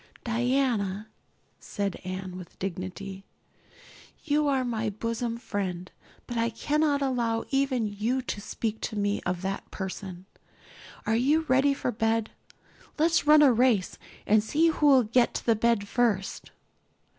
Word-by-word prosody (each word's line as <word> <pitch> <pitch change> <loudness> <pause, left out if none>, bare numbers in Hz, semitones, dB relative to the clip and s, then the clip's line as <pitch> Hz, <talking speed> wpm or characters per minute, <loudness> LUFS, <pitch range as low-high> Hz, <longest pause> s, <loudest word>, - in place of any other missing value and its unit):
"Diana," 235 -4 0 0.5
said 200 -2 -3
Anne 185 0 -5
with 180 -2 -10
dignity, 190 +1 -5 1.0
"you 300 -1 +1
are 265 -2 +1
my 225 -2 -1
bosom 230 +3 -3
friend, 190 -6 -4 0.3
but 240 - -5
I 230 0 +1
cannot 290 +4 0
allow 235 -4 0
even 270 -4 +1
you 220 +5 -1
to 210 - -4
speak 220 +1 -4
to 220 - -4
me 205 0 0
of 180 0 -2
that 195 +1 -4
person. 190 -1 -6 0.8
Are 220 - +1
you 285 +7 +3
ready 275 -1 +3
for 250 - -2
bed? 225 -1 0 0.7
Let's 320 0 +2
run 300 0 +8
a 270 -4 +6
race 230 -5 +2 0.3
and 210 0 +4
see 315 +9 +2
who'll 285 -5 +5
get 235 +2 +2
to - - -4
the 230 - +4
bed 220 -2 +1
first." 210 -5 0
230 Hz, 140 wpm, -27 LUFS, 200-260 Hz, 1.0 s, run